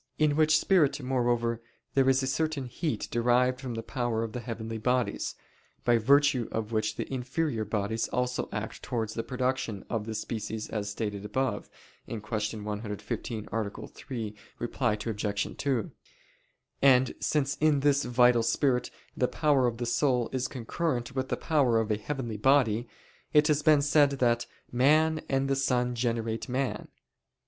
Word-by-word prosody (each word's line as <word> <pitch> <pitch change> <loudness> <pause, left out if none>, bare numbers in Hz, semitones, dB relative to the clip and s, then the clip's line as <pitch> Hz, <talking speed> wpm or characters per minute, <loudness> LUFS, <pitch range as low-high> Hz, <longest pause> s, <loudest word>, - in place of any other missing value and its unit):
In 150 -1 +3
which 155 0 +5
spirit, 155 -5 +3
moreover, 120 -2 0 0.3
there 135 -1 +4
is 135 0 +3
a - - +1
certain 145 +1 -1
heat 125 0 -3
derived 125 +2 +2
from 125 -3 -4
the 115 - -4
power 120 -3 -1
of 110 -1 -5
the 125 - -3
heavenly 115 -1 -5
bodies, 125 +2 0 0.5
by 120 -1 +4
virtue 140 0 +4
of 110 0 -3
which 110 -1 0
the - - -4
inferior 130 -1 -1
bodies 110 +1 -1
also 125 0 -1
act 105 +2 -5
towards 110 -4 -3
the 115 - -2
production 125 -3 -2
of 110 -2 -2
the 110 - -4
species 110 0 -4
as 105 -2 -3
stated 105 -1 -4
above 130 +6 -2 0.4
(Q. 115 - -4 0.4
115, 105 +1 -4
A. 110 -2 -1 0.2
3, 115 -6 -6 0.5
ad 110 -4 +2 0.2
2). 110 +4 -1 0.9
And 130 -2 +5
since 145 -2 0
in 150 -2 +3
this 140 0 +3
(vital) 125 0 +4
spirit 125 +2 +1 0.3
the 125 - +2
power 140 -4 +2
of 115 -1 -2
the 120 - -3
soul 125 0 +1
is 130 -1 -1
concurrent 125 0 -3
with 130 0 -2
the - - -1
power 135 -8 +2
of 110 -1 -1
a 105 - +1
heavenly 120 -1 -4
body, 120 -2 +3 0.5
it 150 -1 +6
has 150 -1 +3
been 150 -2 +5
said 145 0 +5
that 120 -3 +1 0.2
"man 155 +5 +3
and 135 0 +1
the 135 - +1
sun 125 -2 +1
generate 115 -1 -2
man." 130 +1 -2
125 Hz, 155 wpm, -29 LUFS, 115-135 Hz, 0.9 s, it